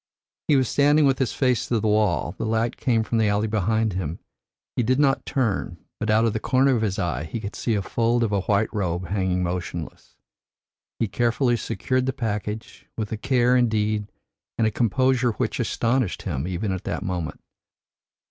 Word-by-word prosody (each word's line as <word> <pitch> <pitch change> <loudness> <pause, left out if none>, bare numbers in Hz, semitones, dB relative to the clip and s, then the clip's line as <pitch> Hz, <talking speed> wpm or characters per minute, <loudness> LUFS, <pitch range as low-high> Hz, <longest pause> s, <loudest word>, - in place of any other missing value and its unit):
"He 150 - +4
was 130 -2 +3
standing 145 +3 +4
with 135 -1 +2
his 130 -4 +1
face 125 -3 +1
to 115 - +1
the 110 - -1
wall, 105 -6 +1
the - - -1
light 115 +2 0
came 115 -3 +1
from 115 +1 -1
the 110 - +3
alley 105 +1 +1
behind 110 0 0
him. 85 -3 -3 0.6
He - - +1
did 130 +2 +2
not 135 -2 +2
turn, 110 -9 -1 0.2
but 110 - -2
out 110 +2 +4
of 115 - +1
the 110 - -1
corner 130 +3 +3
of 115 - 0
his 100 -3 -1
eye 75 -5 -1
he 80 +9 -5
could 105 -1 -6
see 115 - 0
a 100 - -1
fold 120 +3 +1
of 110 - 0
a 100 -1 +1
white 100 +3 +1
robe 90 -4 -2
hanging 95 -2 0
motionless. 85 -2 -5 0.8
He 115 - 0
carefully 120 +4 +1
secured 130 +3 -1
the 130 - 0
package, 110 -3 -4
with 110 -2 -3
a - - -1
care 125 +1 +2
indeed 110 -3 +1 0.5
and 115 - +2
a 110 - +2
composure 125 +2 +2
which - - -2
astonished 120 -3 0
him 70 +6 -3
even 95 +3 -2
at 95 -1 -3
that - - -3
moment. 90 -4 -3
110 Hz, 195 wpm, -24 LUFS, 100-120 Hz, 0.8 s, He